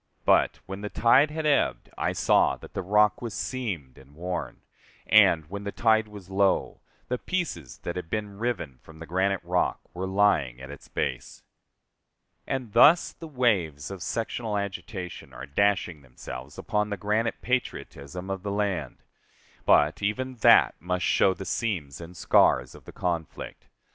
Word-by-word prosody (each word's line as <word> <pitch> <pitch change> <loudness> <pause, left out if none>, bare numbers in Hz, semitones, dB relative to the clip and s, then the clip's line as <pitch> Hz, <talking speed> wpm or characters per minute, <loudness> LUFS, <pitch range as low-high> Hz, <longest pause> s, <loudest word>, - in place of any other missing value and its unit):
But, - - +3
when 95 +1 -7
the 105 - -4
tide 130 +8 +4
had 155 +1 -4
ebbed, 150 -2 +1
I - - -1
saw - - +3
that - - -14
the - - -2
rock 105 +3 +3
was 115 -5 -5
seamed 95 - -4
and 70 +2 -18
worn; 90 +2 -5 0.4
and, 80 -2 +5
when 100 +3 -6
the 100 - -4
tide 110 -1 +2
was 105 -3 -11
low, 100 0 +1 0.3
the 125 0 -2
pieces 170 - -3
that 85 - -4
had 90 -2 -5
been 105 -1 -4
riven 110 - -3
from 80 - -15
the 80 - -9
granite 95 +2 0
rock 90 +1 0
were 95 +2 -4
lying 95 -11 +2
at 65 +1 -9
its 70 - -12
base. - - -4 1.0
And 130 -6 -3
thus 150 +9 +6
the 165 - -10
waves 100 - 0
of 95 -2 -7
sectional 115 -1 -2
agitation 100 -2 -6
are 65 - -8
dashing 85 0 0
themselves 65 -1 -10
against 105 0 -1
the 100 - -3
granite 105 +4 0
patriotism 90 - -3
of 95 -1 -3
the 100 - -4
land. 100 -9 -2 0.6
But 75 +6 +4
even 130 +5 -2
that 110 - +6
must 90 +2 -2
show 95 - +3
the 95 - -7
seams 85 - -3
and 85 +1 -10
scars 60 0 +3
of - - -15
the - - -10
conflict. 85 -3 -4
95 Hz, 165 wpm, -27 LUFS, 80-110 Hz, 1.0 s, thus